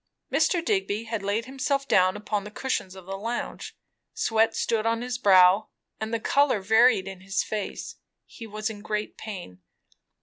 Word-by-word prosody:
Mr. 340 -2 +2
Digby 360 - 0
had 225 -2 -4
laid 205 +3 -1
himself 275 +1 -1
down 185 +1 +3
upon 210 -1 -2
the 210 - -8
cushions 210 -5 -3
of 190 -2 -12
the 195 +1 -5
lounge; 230 +3 -5 0.4
sweat 225 0 +2
stood 225 -2 0
on 230 +1 0
his 245 0 -3
brow, 190 -1 +6 0.3
and 220 0 -4
the 230 - 0
colour 275 -1 +2
varied 220 0 +4
in 190 -1 -8
his 195 +1 -1
face. 210 -2 -5 0.3
He 225 - -10
was 215 +1 -3
in 205 -1 -10
great 210 0 -3
pain. 180 - -8
215 Hz, 170 wpm, -26 LUFS, 195-230 Hz, 0.4 s, brow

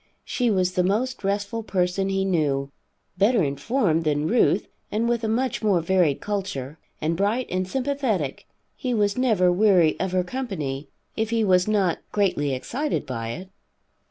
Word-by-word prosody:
She 245 -2 0
was 185 -3 +2
the 180 - +1
most 220 +6 -1
restful 200 +3 -1
person 190 -1 0
he 195 0 0
knew. 145 -7 0 0.5
Better 210 0 +4
informed 160 - 0
than 150 0 0
Ruth 215 -3 +3 0.3
and 225 +2 0
with 235 -1 0
a - - 0
much 245 +3 0
more 205 -5 +3
varied 170 -4 +2
culture, 160 -9 -4 0.2
and 160 +2 0
bright 210 +7 0
and 185 0 -1
sympathetic, 250 - -2 0.3
he 250 -3 -2
was 205 -2 +2
never 220 -8 +3
weary 180 -4 +4
of 190 -1 -1
her 185 -1 +2
company, 155 - -4 0.3
if 220 0 -1
he 230 -1 +1
was 185 -2 +3
not 195 -5 +1
greatly 180 -9 +1
excited 270 - -2
by 115 -4 -4
it. 185 +10 -6
195 Hz, 160 wpm, -24 LUFS, 165-220 Hz, 0.5 s, Better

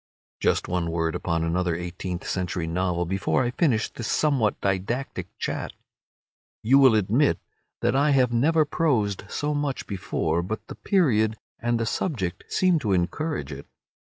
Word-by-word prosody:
Just - - +1
one 85 -2 -1
word 80 -1 -1
upon 85 -2 -1
another 85 +1 0
eighteenth 90 +1 -5
century 90 -2 -2
novel 90 +1 -1
before 95 +8 0
I 120 - -1
finish 125 -6 +1
this 115 - -6
somewhat 135 -9 +1
didactic 100 +8 -2
chat. - - -3 0.9
You 130 +5 +5
will 130 -5 +7
admit 110 +8 +3 0.4
that - - +2
I 140 +2 +3
have 130 -4 +3
never 155 +6 +3
prosed 130 - 0
so 150 +1 -1
much 145 -2 -2
before, 85 -4 -1
but 105 +5 -5
the - - -5
period 110 - +2 0.2
and 120 0 0
the 115 - 0
subject 110 - -2
seem 180 -3 +2
to 105 -8 0
encourage 95 - -1
it. 70 0 -8
110 Hz, 155 wpm, -25 LUFS, 90-135 Hz, 0.9 s, will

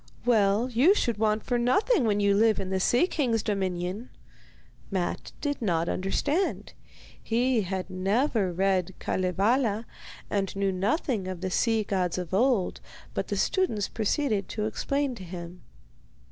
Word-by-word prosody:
'Well, 215 -1 +3
you 280 - +5
should 235 - 0
want 215 -1 +1
for 245 -1 0
nothing 265 - +2
when 205 -2 +2
you 200 -1 +3
live 220 +1 +3
in 190 - -4
the 190 - +1
Sea 240 - +3
King's 245 - 0
dominion.' 190 +1 -2 0.8
Matte 185 -3 -3
did 290 -3 -2
not 170 -6 0
understand. 285 - -1 0.5
He 240 +1 +1
had 190 -1 -3
never 195 +2 0
read 190 0 0
Kalevala 210 +5 0 0.4
and 195 -2 -2
knew 195 0 +1
nothing 205 - -1
of 185 -2 -5
the 185 0 -2
sea 225 +2 +2
gods 185 -4 -1
of 180 -1 -5
old, 230 -2 +2 0.3
but - - -2
the - - -2
students 290 - +1
proceeded 220 -1 -1
to 210 0 -2
explain 275 +5 -1
to 195 - -9
him. 175 0 -8
205 Hz, 145 wpm, -27 LUFS, 190-245 Hz, 0.8 s, you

